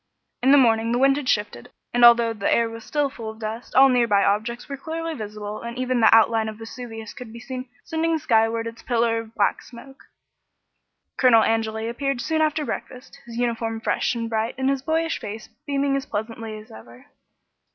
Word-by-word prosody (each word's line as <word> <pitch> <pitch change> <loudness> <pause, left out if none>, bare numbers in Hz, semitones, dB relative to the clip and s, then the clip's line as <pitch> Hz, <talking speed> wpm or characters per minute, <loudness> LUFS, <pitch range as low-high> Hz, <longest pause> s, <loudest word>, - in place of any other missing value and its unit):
In 260 +2 +4
the 285 - +8
morning 230 -3 +3
the 240 - +1
wind 270 +1 +4
had 290 -3 -3
shifted, 205 - -1 0.2
and 245 0 +2
although 235 -1 +7
the 205 -3 -1
air 235 0 +3
was 225 0 -9
still 295 +2 0
full 230 -5 -7
of 220 - -9
dust 225 +2 -6
all 270 +1 +8
near 245 -2 +3
by 200 -2 +3
objects 220 +4 -1
were 280 - -5
clearly 325 +3 -5
visible 210 -4 -6
and 235 +1 -7
even 255 -1 0
the 220 - +6
outline 225 0 +4
of 215 - -9
Vesuvius 225 -1 -8
could 245 -3 -10
be 235 - -10
seen 255 +1 -7
sending 325 0 0
skyward 225 -4 +1
its 230 0 -7
pillar 230 -2 +1
of 225 0 -10
black 205 - +1
smoke. 270 +3 -14 1.1
Colonel 235 -4 +5
Angeli 220 0 -1
appeared 275 +2 -2
soon 315 +6 0
after 305 -1 +1
breakfast, 250 -2 -7
his 230 -1 -8
uniform 230 -2 -1
fresh 225 - 0
and 230 -1 -3
bright 225 +1 -2
and 265 +1 +1
his 275 -1 -1
boyish 325 +3 -1
face 215 +1 -8 0.2
beaming 280 -1 0
as 275 +1 -3
pleasantly 220 +1 -5
as 215 0 -13
ever. 115 +2 -14
235 Hz, 200 wpm, -23 LUFS, 225-265 Hz, 1.1 s, the